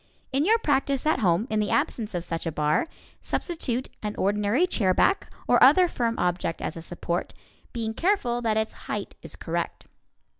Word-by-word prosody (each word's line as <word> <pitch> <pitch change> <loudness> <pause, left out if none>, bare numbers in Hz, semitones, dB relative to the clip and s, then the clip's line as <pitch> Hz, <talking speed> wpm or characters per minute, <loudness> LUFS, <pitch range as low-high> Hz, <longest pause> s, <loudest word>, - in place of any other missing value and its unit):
In 275 +3 +1
your 445 +4 +5
practice 275 - 0
at 310 -3 +2
home, 185 0 +2
in 215 - +1
the 210 - 0
absence 220 -4 0
of 175 - -2
such 165 -1 -4
a - - -1
bar, 150 - +1 0.3
substitute 260 -7 -2
an 210 -1 -3
ordinary 210 - +2
chairback 225 - +2 0.2
or - - +4
other 365 -1 +7
firm 235 -7 -1
object 175 -2 -1
as - - -4
a 165 - -7
support, 175 +1 -3 0.4
being 225 -2 -3
careful 250 - +1
that 220 -2 +1
its 220 0 -1 0.2
height - - -3
is - - -6
correct. - - -4
220 Hz, 175 wpm, -26 LUFS, 185-275 Hz, 0.4 s, other